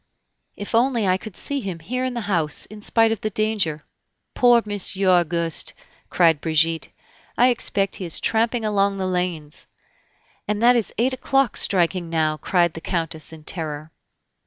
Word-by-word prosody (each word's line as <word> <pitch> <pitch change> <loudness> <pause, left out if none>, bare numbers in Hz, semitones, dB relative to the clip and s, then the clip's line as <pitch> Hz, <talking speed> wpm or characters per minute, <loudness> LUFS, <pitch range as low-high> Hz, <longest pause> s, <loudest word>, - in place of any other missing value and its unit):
"If 205 - -8
only 235 -2 +2
I 185 0 +3
could 205 0 -10
see 285 0 -1
him 190 -8 -5
here 250 +10 -4
in 255 -1 -2
the 235 - -2
house, 170 -8 0
in 210 0 -12
spite 225 +1 +3
of 225 - -3
the 215 - -1
danger." 205 -8 -1 0.5
"Poor 240 -2 +4
Monsieur 200 -1 +1
Auguste!" 170 -2 +1 0.3
cried 165 -4 +3
Brigitte; 160 0 +1 0.5
"I 250 +1 +5
expect 200 -5 0
he 190 - -5
is 165 - 0
tramping 230 +1 0
along 200 -1 +1
the 190 - -2
lanes!" 180 -5 -3 0.8
"And 210 0 -1
that 245 +1 +6
is 225 -6 0
eight 250 +4 +1
o'clock 270 -2 0
striking 175 -2 +2
now!" 155 -2 0
cried 175 0 +1
the 165 - -8
Countess 165 -3 -3
in 160 -1 -12
terror. 155 -1 -4
190 Hz, 165 wpm, -22 LUFS, 165-225 Hz, 0.8 s, that